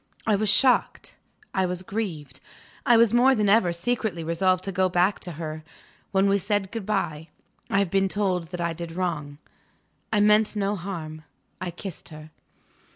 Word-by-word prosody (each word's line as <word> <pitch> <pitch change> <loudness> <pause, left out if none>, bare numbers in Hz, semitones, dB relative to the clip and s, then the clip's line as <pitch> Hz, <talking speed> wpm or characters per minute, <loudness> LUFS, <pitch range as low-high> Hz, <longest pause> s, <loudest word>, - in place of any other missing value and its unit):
I 215 - +3
was 210 +1 0
shocked; 250 +5 +3 0.4
I 190 -1 +1
was 180 0 -3
grieved; 165 -10 -5 0.5
I 240 - +6
was 230 -1 +4
more 255 +2 +5
than 210 -3 +1
ever 200 -3 +4
secretly 175 -1 -2
resolved 185 +3 +1
to 195 - -3
go 185 0 +1
back 180 +3 +2
to 175 - -5
her. 155 0 -6 0.5
When 195 0 +3
we 200 0 +3
said 200 0 -1
good 225 -4 -6
bye 160 -7 -2 0.4
I - - +1
have 200 -4 +1
been 195 0 +2
told 190 -3 -1
that 175 +1 -6
I 170 -1 -1
did 165 0 -7
wrong; 160 -5 -3 0.7
I 215 - +2
meant 210 +1 +4
no 205 0 0
harm 165 -5 -6 0.4
I 185 - -3
kissed 175 0 -9
her. 155 0 -12
185 Hz, 175 wpm, -25 LUFS, 170-205 Hz, 0.7 s, I